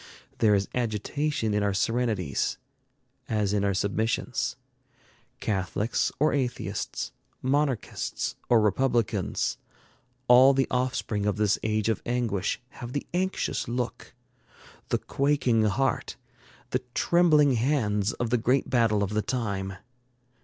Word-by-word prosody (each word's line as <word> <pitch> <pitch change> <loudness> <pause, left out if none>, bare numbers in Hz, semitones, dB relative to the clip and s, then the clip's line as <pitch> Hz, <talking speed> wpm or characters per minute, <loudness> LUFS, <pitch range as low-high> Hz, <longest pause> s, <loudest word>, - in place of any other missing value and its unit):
There 105 -2 +5
is 100 0 0
agitation 120 +1 -1
in 105 - +1
our 100 -1 0
serenities, 110 - 0 0.7
as 105 -2 0
in 100 -1 +1
our 100 -1 +1
submissions. 110 +4 -1 0.8
Catholics 105 +2 -1
or 150 - +3
atheists, 130 -4 -2 0.3
monarchists 135 -3 -1
or 120 - +6
republicans, 110 -2 0 0.7
all 130 +3 +7
the 135 -1 +3
offspring 125 -5 -1
of 105 - 0
this 105 -1 +2
age 110 -1 0
of 110 -3 0
anguish 120 -6 -1
have 120 -1 -8
the 145 - -2
anxious 185 +2 -1
look, 120 0 -4 0.7
the - - +2
quaking 135 -6 +1
heart, 135 +6 0 0.6
the 125 - 0
trembling 155 -5 +4
hands 110 -5 +1
of 120 -2 -3
the 125 - +3
great 125 +4 +1
battle 115 -4 +3
of 100 - -2
the 105 0 +1
time. 100 -6 -2
115 Hz, 120 wpm, -27 LUFS, 105-130 Hz, 0.8 s, all